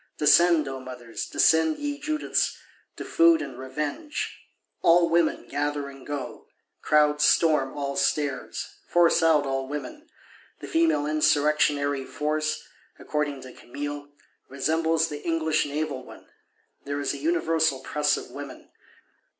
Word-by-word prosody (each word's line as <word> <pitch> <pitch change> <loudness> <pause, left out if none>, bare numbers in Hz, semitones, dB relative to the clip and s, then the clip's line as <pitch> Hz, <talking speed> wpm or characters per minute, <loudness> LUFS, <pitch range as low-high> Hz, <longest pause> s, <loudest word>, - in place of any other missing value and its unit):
Descend, 160 +1 +5
O 135 0 -5
mothers; 125 -3 -7
descend, 160 -1 +3
ye 290 0 -4
Judiths, 305 +1 -1 0.4
to - - -7
food 335 -1 +4
and 125 - -7
revenge!—All 165 - -1
women 170 -1 +1
gather 145 -1 -2
and 135 -1 -13
go; 145 -4 -6 0.3
crowds 150 -1 +3
storm 150 -3 +3
all 140 -1 -3
stairs, 145 -3 -2
force 175 -1 +4
out 160 -3 +4
all 135 -1 -2
women: 300 - -7 0.5
the - - -8
female 325 - +2
Insurrectionary 150 -2 +2
Force, 155 +3 -2 0.3
according 145 -3 -3
to 130 -1 -11
Camille, 145 +3 -7 0.4
resembles 160 +4 +1
the 150 -2 -7
English 160 -3 0
Naval 145 -3 -3
one; - - -14 0.6
there 145 0 -3
is 140 -1 -1
a - - -6
universal 160 -2 +1
"Press 150 +2 0
of - - -9
women." - - -10
150 Hz, 125 wpm, -26 LUFS, 140-165 Hz, 0.6 s, Descend